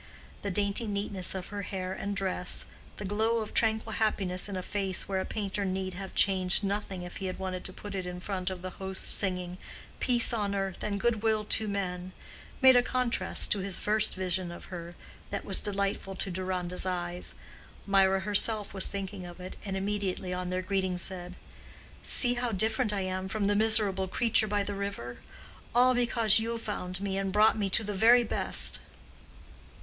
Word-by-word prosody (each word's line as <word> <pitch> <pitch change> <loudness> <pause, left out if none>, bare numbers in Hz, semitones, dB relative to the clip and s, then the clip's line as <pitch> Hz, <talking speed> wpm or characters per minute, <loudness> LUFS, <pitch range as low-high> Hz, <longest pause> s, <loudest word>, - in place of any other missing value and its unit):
The 200 - -2
dainty 200 +3 0
neatness 200 -2 -1
of 185 -2 -5
her 205 -1 -4
hair 185 -1 -4
and 200 +1 -4
dress, 185 -2 +2 0.3
the 210 - -5
glow 220 +4 +1
of 220 -2 -4
tranquil 220 -1 +1
happiness 195 -4 0
in 195 - -4
a 185 - -4
face 195 -2 -2
where 195 -1 -1
a - - -4
painter 205 -1 -3
need 190 -1 -2
have 190 +1 -7
changed 190 0 +4
nothing 195 -2 -2
if 175 - -8
he 195 - -4
had 185 - -4
wanted 185 -1 -4
to - - -2
put 205 +1 -8
it 185 -2 -3
in 180 0 -5
front 185 0 -3
of 185 -1 -7
the 185 - -4
host 190 0 -4
singing 180 -2 +2 0.4
"peace 240 -1 +3
on 205 -3 -1
earth 195 -2 -3
and 200 -1 -2
good 225 0 +1
will 215 -1 +1
to 220 +1 +1
men," 185 -2 -3 0.5
made 260 -1 +9
a 245 - +7
contrast 250 -1 0
to 205 - +2
his 190 -1 -2
first 215 +1 +1
vision 185 -1 -1
of 175 - -10
her 170 0 -7 0.3
that - - -4
was - - +3
delightful 195 -1 -1
to 190 - -3
Deronda's 185 0 -3
eyes. 175 -1 -2 0.5
Mirah 195 -1 +3
herself 210 +1 +1
was 190 - 0
thinking 195 -1 -5
of 175 0 -10
it, 185 +1 -8
and 195 -2 -3
immediately 195 -2 -2
on 180 0 -3
their 185 0 -2
greeting 190 -1 -1
said, 180 0 -2 0.7
"See 245 -2 +6
how 245 -1 -1
different 220 +3 +1
I 200 -1 -1
am 185 0 -3
from 210 0 -1
the 205 +1 +2
miserable 210 -3 +2
creature 225 +2 +2
by 205 -1 0
the 205 - -4
river! 195 -12 -5 0.6
all 250 +1 +6
because 235 -3 +3
you 230 +1 -2
found 190 -4 -5
me 195 -1 -1
and 195 -1 -2
brought 210 +2 +5
me 205 -3 -1
to 220 - +3
the 210 0 -3
very 235 +5 +6
best." 225 - +3
195 Hz, 190 wpm, -29 LUFS, 185-210 Hz, 0.7 s, made